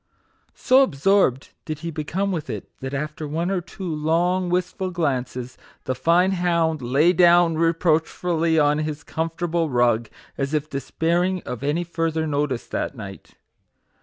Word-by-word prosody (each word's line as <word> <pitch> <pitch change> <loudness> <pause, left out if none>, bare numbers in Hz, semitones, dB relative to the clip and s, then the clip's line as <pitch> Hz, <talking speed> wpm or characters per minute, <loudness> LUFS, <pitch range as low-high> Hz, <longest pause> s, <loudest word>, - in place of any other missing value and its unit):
So 260 +2 +4
absorbed 155 - +2
did 155 -1 -6
he 170 - -2
become 170 +6 -2
with 160 -4 -4
it, - - -5
that 135 +1 -5
after 150 +2 -4
one 165 +5 -2
or 190 -2 0
two 180 +3 -11
long, 175 +3 0
wistful 180 +1 -1
glances, 130 -7 -3 0.2
the 130 - -1
fine 170 +8 +3
hound 170 -4 +1
lay 140 +8 +3
down 175 -1 +5
reproachfully 165 0 +1
on 150 0 +3
his 155 -1 -4
com 160 +2 -2
fortable 165 -1 -2
rug, 120 -2 +2 0.3
as 140 +2 -1
if 150 0 -2
despairing 170 +6 0
of 125 - -6
any 150 +5 0
further 165 -2 -1
notice 145 -4 -1
that - - -3
night. 100 -5 -10
160 Hz, 150 wpm, -23 LUFS, 145-175 Hz, 0.3 s, down